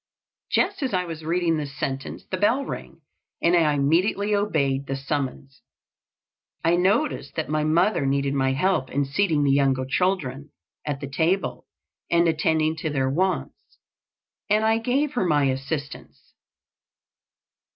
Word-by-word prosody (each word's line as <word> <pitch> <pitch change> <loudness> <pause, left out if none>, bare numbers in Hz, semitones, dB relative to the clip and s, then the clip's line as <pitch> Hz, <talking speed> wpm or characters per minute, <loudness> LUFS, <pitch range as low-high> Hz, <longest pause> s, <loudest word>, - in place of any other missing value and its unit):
Just - - +1
as 260 -7 -1
I 180 0 0
was 165 -2 -7
reading 165 0 +1
this 140 -2 -5
sentence 135 -2 -4
the 185 - -4
bell 235 +8 +2
rang, - - -7 0.4
and 170 +1 +3
I 155 -4 +3
immediately 180 +9 +1
obeyed 140 -10 0
the 135 - -2
summons. 135 -1 -4 1.0
I 170 +1 +4
noticed 190 - 0
that - - -3
my 155 0 0
mother 170 0 +2
needed 140 0 0
my 135 -1 +1
help 150 -1 +1
in 140 0 0
seating 155 +1 +1
the 140 - +3
younger 135 -2 +2
children 145 -4 -1 0.4
at 145 -2 -2
the 140 - -4
table 165 +8 -1 0.4
and 170 0 +3
attending 160 0 +1
to 155 - -3
their 135 -2 0
wants, 185 +6 -2 0.7
and 215 +1 +3
I 225 +1 +3
gave 265 +5 0
her 245 - 0
my 150 -5 +2
assistance. 140 +2 -6
155 Hz, 145 wpm, -24 LUFS, 140-185 Hz, 1.0 s, I